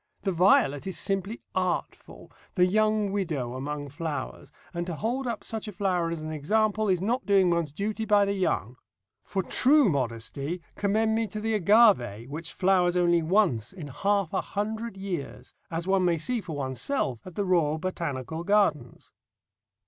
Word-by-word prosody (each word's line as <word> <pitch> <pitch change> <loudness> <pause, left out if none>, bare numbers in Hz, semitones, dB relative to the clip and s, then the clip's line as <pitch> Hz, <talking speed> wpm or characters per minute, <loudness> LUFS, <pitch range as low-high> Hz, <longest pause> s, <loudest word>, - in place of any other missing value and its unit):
The 195 - 0
violet 170 -4 +3
is 190 - -3
simply 195 +3 -2
artful, 185 -1 -3 0.2
the 180 -2 +5
young 215 +1 +2
widow 155 -12 -2
among 145 +2 -4
flowers, 150 -1 -5 0.2
and 175 0 -3
to 175 - -3
hold 245 - -2
up 235 -2 -3
such 220 -1 -4
a - - -4
flower 180 -3 0
as 165 -2 -4
an 155 - -5
example 215 +8 +1
is 185 -2 +1
not 240 +6 -1
doing 195 -3 +4
one's 170 -3 0
duty 210 +7 -3
by 205 -1 +4
the 200 - 0
young. 130 - -1 0.5
For 190 -1 -2
true 280 - +4
modesty 140 +5 -3
commend 220 +2 +1
me 225 0 0
to 215 - -6
the 220 +1 -1
agave, 195 - +4
which 160 +3 -5
flowers 180 -2 +2
once 175 - +2
only - - -12
in 145 - -6
half 200 -1 0
a 190 - +1
hundred 215 +1 -4
years, 190 -7 -6 0.2
as 165 +1 -3
one 190 0 +2
may 175 -2 +2
see 230 +9 -1
for 165 -6 -6
oneself 130 - -2
at 185 -3 -11
the 205 - -1
Royal 165 -5 +2
Botanical 160 -3 -4
Gardens. 200 -5 0
185 Hz, 170 wpm, -27 LUFS, 155-210 Hz, 0.5 s, the